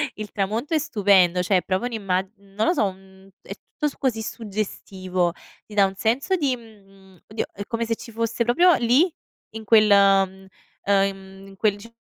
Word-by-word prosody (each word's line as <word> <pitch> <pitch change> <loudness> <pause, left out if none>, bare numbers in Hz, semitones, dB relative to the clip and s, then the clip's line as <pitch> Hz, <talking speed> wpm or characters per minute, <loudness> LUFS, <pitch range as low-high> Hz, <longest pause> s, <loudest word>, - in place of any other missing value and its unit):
Il 215 -1 -7
tramonto 220 - -2
è 315 - +3
stupendo, 190 - +3
cioè 190 +1 +2
è 180 - +1
proprio 190 +6 -1
un'imma 195 -6 -1 0.2
non 200 +2 -4
lo - - +3
so 280 - +1
un 190 0 -9
è - - -8
tutto 300 - -5
su 285 - -7
così 245 -5 -1
suggestivo, 190 -5 -3 0.3
ti 215 - -13
dà 200 -1 +5
un 195 0 -4
senso 245 - 0
di, 280 -7 0
mhmm, 195 -5 -19
oddio 215 +1 -3
è 200 - -6
come 230 0 -2
se 230 0 -1
ci 230 - -11
fosse 230 +1 -1
proprio 345 +10 +4
lì 265 +9 +2 0.4
in 220 - -6
quel, 215 -1 +5
ehm 195 -1 +3 0.4
ehm, 195 -1 -1
in 195 - -14
quel 210 +1 +1
diciamo 230 +3 -15
205 Hz, 190 wpm, -23 LUFS, 195-230 Hz, 0.4 s, dà